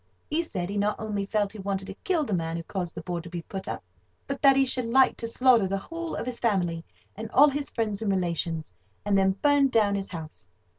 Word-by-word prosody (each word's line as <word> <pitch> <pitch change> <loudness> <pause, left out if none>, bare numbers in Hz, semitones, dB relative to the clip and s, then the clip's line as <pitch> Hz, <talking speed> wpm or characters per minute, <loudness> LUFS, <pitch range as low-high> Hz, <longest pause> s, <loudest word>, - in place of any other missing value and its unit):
He 315 +3 +2
said 190 - -4
he 205 - -3
not 205 +1 +1
only 205 -2 -3
felt 205 -1 0
he 220 - -10
wanted 195 0 -2
to 195 - -7
kill 335 - 0
the 220 - -3
man 165 -2 -1
who 165 - -5
caused 175 -1 -4
the - - -6
board 175 -2 -3
to 170 - -9
be 170 -1 -5
put 190 +2 -7
up, - - -4 0.4
but 275 0 -4
that 275 -1 +7
he 270 0 +4
should 255 -1 -1
like 260 +3 +4
to 230 - -4
slaughter 235 -3 +4
the 195 +1 -1
whole 335 +10 -5
of - - -3
his 250 -1 -4
family 175 -7 0 0.3
and 220 +1 -6
all 285 +5 +6
his 285 0 -3
friends 215 -3 -2
and 215 - -1
relations, 170 - -1 0.3
and 205 -1 +2
then 190 0 +3
burn 285 -1 +5
down 220 -5 +3
his 200 -1 -2
house. 155 - -8
205 Hz, 245 wpm, -27 LUFS, 185-255 Hz, 0.4 s, that